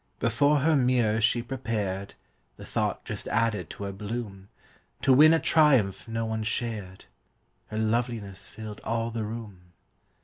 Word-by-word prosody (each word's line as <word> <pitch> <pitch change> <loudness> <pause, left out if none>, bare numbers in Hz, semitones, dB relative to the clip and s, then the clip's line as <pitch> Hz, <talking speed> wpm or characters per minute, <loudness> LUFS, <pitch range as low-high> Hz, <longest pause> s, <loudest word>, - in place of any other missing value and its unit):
Before 145 +5 +2
her 160 +2 +3
mirror 125 -4 +2
she 115 +2 +2
prepared 105 -6 -3 0.4
(The - - -10
thought - - -2
just - - -5
added 115 -5 0
to - - -7
her 100 - -3
bloom) 100 -1 -6 0.5
To 135 - +5
win 155 +4 +8
a 165 - +4
triumph 135 - +3
no 115 0 -2
one 110 0 -2
shared. 110 -4 -3 0.6
Her 110 - -6
loveliness 110 -3 -2
filled 110 -1 -8
all 115 0 -1
the 115 -1 -3
room. 105 -5 -8
115 Hz, 145 wpm, -27 LUFS, 105-120 Hz, 0.6 s, win